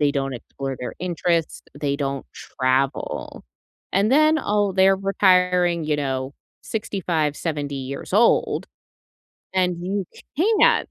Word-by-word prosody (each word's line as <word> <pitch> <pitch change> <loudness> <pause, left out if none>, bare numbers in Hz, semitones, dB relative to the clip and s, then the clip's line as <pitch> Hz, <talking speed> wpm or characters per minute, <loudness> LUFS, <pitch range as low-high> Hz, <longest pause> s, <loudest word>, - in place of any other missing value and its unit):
They 145 -1 +3
don't 135 -1 -1
explore 135 +2 -6
their 125 - -5
interests. 170 -2 -1 0.2
They 140 -1 0
don't 140 -1 -3
travel, 130 +1 -2 0.5
and 200 +3 +2
then, 310 +2 +5
oh, 205 -1 +1
they're 190 +1 +4
retiring, 180 -3 +3
you 150 -1 0
know, 135 -2 -2 0.3
65, 170 -8 -2
70 145 -4 -3
years 135 +4 -6
old, 230 +3 +3 0.9
and 180 -2 +2
you 195 +1 -1 0.3
can't 450 - +4
170 Hz, 120 wpm, -23 LUFS, 140-195 Hz, 0.9 s, then